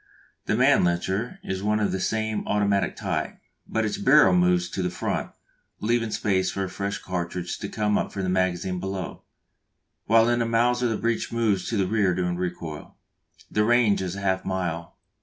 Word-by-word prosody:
The - - +2
Mannlicher 95 - +2
is 95 0 -3
of 105 0 +1
the 95 - -2
same 110 +1 -1
automatic 100 -2 +1
type, - - -3 0.3
but 110 0 0
its 105 -1 -2
barrel 130 -3 +6
moves 90 0 +3
to 95 - -3
the 90 - 0
front, - - -3 0.5
leaving 115 +1 0
space 95 -3 0
for 100 - -2
a 95 - -3
fresh 100 +2 -3
cartridge 90 -1 -4
to 100 - -5
come 105 -1 +1
up - - -3
from 100 - -4
the 95 - -1
magazine 90 0 0
below, 95 -1 -5 0.9
while 115 +1 +5
in 120 0 +2
the 115 - +1
Mauser 120 +2 +2
the 110 -2 -1
breech 115 0 -1
moves 110 -5 0
to 115 - -1
the 95 - +2
rear 100 -2 +1
during 90 -1 -1
recoil. 85 -4 -5 0.6
The 105 - +2
range 115 -3 +3
is 95 -1 -3
half 95 -1 -1
a - - -9
mile. 85 -3 -3
100 Hz, 180 wpm, -25 LUFS, 90-110 Hz, 0.9 s, barrel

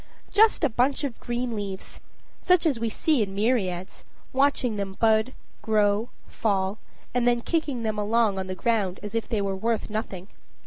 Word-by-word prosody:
Just 435 -3 +4
a 295 - +4
bunch 255 +5 +1
of 270 -5 -3
green 240 -1 -3
leaves 200 -2 -6 0.4
such 360 -1 +3
as 280 -7 +2
we 230 0 -1
see 295 +3 +1
in 195 -2 -2
myriads; 195 -5 -1 0.3
watching 265 -4 +2
them 195 -2 -4
bud, 220 +2 +3 0.3
grow, 215 +1 +2 0.2
fall, 195 -1 -1 0.3
and 245 0 +1
then 240 -1 +3
kicking 290 -5 -1
them 215 -1 -1
along 210 -1 +2
on 190 - -4
the 185 - -4
ground 200 -3 0
as 210 0 -6
if 230 -1 -2
they 220 -4 0
were 195 -1 -1
worth 225 +2 -1
nothing. 195 -4 -4
220 Hz, 175 wpm, -26 LUFS, 200-245 Hz, 0.4 s, Just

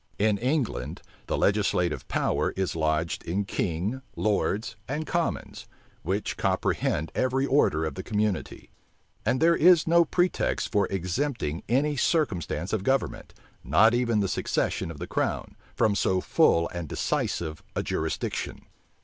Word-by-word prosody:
In 105 -1 +2
England, 130 +1 -1 0.2
the - - -1
legislative 100 -4 +1
power - - 0
is 95 -3 -1
lodged 80 +1 0
in 95 +4 -1
king, 95 +8 -2
lords, 105 +1 0
and 150 +4 -3
commons, 170 0 -2 0.3
which 95 +5 -2
comprehend 80 +2 0
every 130 +1 +1
order 105 - +2
of 80 - -3
the - - -5
community; 105 -3 -2 0.6
and 130 - +2
there 170 +2 +5
is 175 0 +6
no 170 +1 +5
pretext 175 +2 0
for 100 -3 +2
exempting 95 - -2
any 145 +5 +2
circumstance 110 - 0
of 110 - +1
government, 135 +4 -1 0.3
not 110 +3 +5
even 120 -3 +2
the 100 - +1
succession 85 - -1
of 80 - -7
the - - -5
crown, - - -2 0.2
from 110 - +3
so 95 -2 +1
full 85 -2 +3
and 85 -4 -6
decisive 80 -2 -2
a - - 0
jurisdiction. - - -3
105 Hz, 140 wpm, -27 LUFS, 90-135 Hz, 0.6 s, is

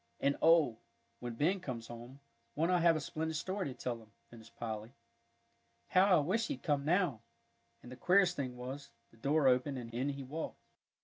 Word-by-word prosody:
"And 140 +1 +2
oh, 160 -9 +5 0.4
when 120 -1 -5
Ben 175 +10 +2
comes 120 -8 -5
home, 120 +4 -10 0.3
won't 165 +4 +1
I 180 - +4
have 170 -1 +5
a - - 0
splendid 160 +2 -3
story 185 +3 -2
to 130 - -6
tell 120 -2 -4
him!" 110 -1 -19 0.2
finished 115 -1 -14
Polly. 110 0 -5 1.0
"How 185 0 +5
I - - +4
wish 215 +10 0
he'd 280 -1 -5
come 145 -3 +1
now," 160 - +1 0.6
and 125 - -11
the - - -7
queerest 180 +3 +4
thing 130 -4 -4
was, 130 +3 -7 0.2
the 115 - -21
door 140 +4 +2
opened, 130 +2 +2
and 115 -2 -7
in 130 +4 -1
he 140 -1 -4
walked. 150 +5 -5
140 Hz, 190 wpm, -34 LUFS, 120-165 Hz, 1.0 s, oh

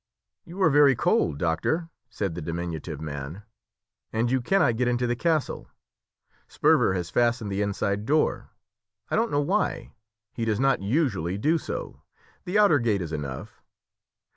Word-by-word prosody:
"You 175 +3 -10
are 160 - +5
very 140 -2 +6
cold, 70 - +1
doctor," 90 - -1 0.2
said 100 -6 -3
the 85 - -6
diminutive 80 -2 -5
man, 75 +5 -6 0.7
"and 115 +2 0
you 130 -1 +2
cannot 140 -5 +2
get 125 0 +1
into 125 0 +1
the 120 0 0
castle. 160 +2 -1 0.8
Sperver 95 - +3
has 85 -2 -3
fastened 120 -3 +1
the 100 +1 -1
inside 100 +1 -1
door, 155 +2 +1 0.6
I - - +2
don't 230 +1 +1
know 145 - +1
why; 190 +9 -1 0.4
he 115 - -4
does 110 -1 0
not 135 -3 +2
usually 100 - 0
do 155 +10 +2
so; - - -6 0.4
the 185 +3 0
outer 200 -9 +5
gate 110 -6 0
is 80 -1 -6
enough. 70 -4 -6
115 Hz, 155 wpm, -26 LUFS, 90-145 Hz, 0.8 s, very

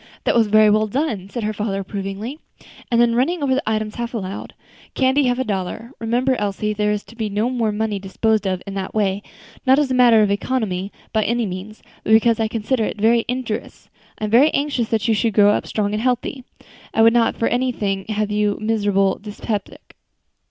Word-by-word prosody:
"That - - +2
was 230 -2 +3
very 215 +1 +5
well 215 +1 +2
done," 215 -6 -2
said 235 +2 -4
her 215 +1 -1
father 205 -1 -2
approvingly. 195 +7 -5 0.5
And 235 - +2
then 235 -1 +4
running 290 +7 +1
over 270 -2 +2
the 265 - +1
items 215 -1 -1
half 235 0 -5
aloud, 195 -2 -6 0.4
"Candy, 265 +2 +3
half 245 -1 +1
a 260 - 0
dollar; 205 +2 -4
remember, 245 +3 +1
Elsie, 210 +1 -2
there 210 0 0
is 210 -1 -2
to 235 - -16
be 220 -2 -3
no 210 +5 0
more 230 -4 0
money 210 -1 -2
disposed 210 +2 0
of 185 -1 -2
in 200 - -6
that 195 0 -5
way; 200 -2 +1 0.4
not 265 0 +5
as 290 -3 +1
a - - +2
matter 240 -3 +6
of 205 - +1
economy, 200 -3 -2 0.2
by 220 -1 +2
any 235 +2 0
means, 195 +3 -7 0.2
but 220 - +2
because 225 +1 +4
I 220 - +1
consider 225 +1 -1
is - - -3
very 225 +2 +3
injurious. 250 -3 -4 0.3
I - - -8
am 210 - -2
very 260 +7 +6
anxious 280 -5 -1
that 220 0 0
you 225 - +3
should 220 0 0
grow 205 -1 +6
up - - -1
strong 210 -1 -1
and 210 - -1
healthy. 250 +1 -1 0.5
I 225 - +5
would 230 0 +6
not 235 -1 +2
for 230 - +1
anything 215 -6 -1
have 215 -1 -2
you 210 -1 +1
a - - -10
miserable 205 -3 +1
dyspeptic." 210 0 -6
220 Hz, 215 wpm, -20 LUFS, 205-240 Hz, 0.5 s, matter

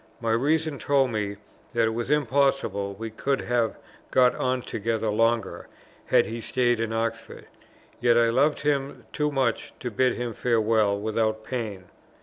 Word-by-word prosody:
My 115 -1 -1
reason 150 +5 +1
told 135 -3 +2
me 105 -2 -2 0.4
that 115 -2 +3
it 110 - 0
was 120 +1 -3
impossible 135 -8 +1
we 115 +2 -6
could 135 +5 -1
have 120 -2 0 0.3
got 125 -1 +4
on 130 -1 -1
together 110 0 -2
longer, 115 0 0 0.4
had - - +4
he 115 +1 -5
stayed 120 -1 +1
in 115 -1 -1
Oxford; 115 0 -3 0.5
yet 120 0 +4
I 115 -1 +4
loved 140 +6 +2
him 140 -2 -1
too 150 0 0
much 130 -5 -1
to 125 - -4
bid 125 +4 +2
him 120 -1 -4
farewell 110 -3 +2
without 110 +1 -1
pain. 110 -6 -4
115 Hz, 155 wpm, -26 LUFS, 110-130 Hz, 0.5 s, got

